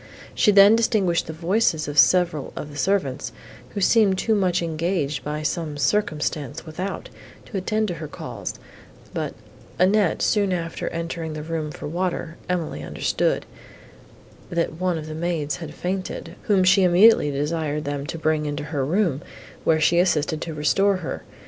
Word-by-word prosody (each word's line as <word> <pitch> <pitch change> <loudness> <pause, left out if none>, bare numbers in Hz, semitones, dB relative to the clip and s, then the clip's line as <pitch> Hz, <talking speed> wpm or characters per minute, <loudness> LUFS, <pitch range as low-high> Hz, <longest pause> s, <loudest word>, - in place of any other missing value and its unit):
She 210 - +4
then 200 +2 +8
distinguished 210 -7 +1
the - - -4
voices 170 0 +1
of 145 0 +1
several 175 -5 +3
of 150 - -6
the - - -11
servants, 165 -5 0 0.4
who 200 - -2
seemed 200 -1 +4
too 220 - +1
much 185 -4 +1
engaged 160 -3 -1
by 150 +1 -3
some 155 -2 -2
circumstance 150 -3 -1
without, 180 +5 -5 0.4
to 205 - -5
attend 215 +3 0
to - - -2
her 155 - -4
calls; - - -6 0.6
but, - - -3 0.4
Annette 190 0 +3
soon 200 -3 +2
after 165 -2 -3
entering 165 -1 -4
the 155 0 -5
room 160 -1 -3
for 150 - -7
water, 170 0 -3
Emily 175 -4 -2
understood, - - -1 1.0
that 170 -2 -1
one 180 -2 +1
of 155 - -6
the 155 - -6
maids 160 -2 -2
had 165 -3 -7
fainted, 185 +1 -4
whom 195 -3 +3
she 190 +2 +5
immediately 185 -1 +6
desired 150 +1 -2
them 145 0 -3
to 165 - -4
bring 155 -1 0
into 145 0 -3
her 150 -2 -2
room, 165 -1 +1 0.4
where 160 -1 +3
she 170 +2 +3
assisted 155 -3 +1
to 165 -2 -5
restore 195 +7 +2
her. - - -4
165 Hz, 160 wpm, -23 LUFS, 150-190 Hz, 1.0 s, then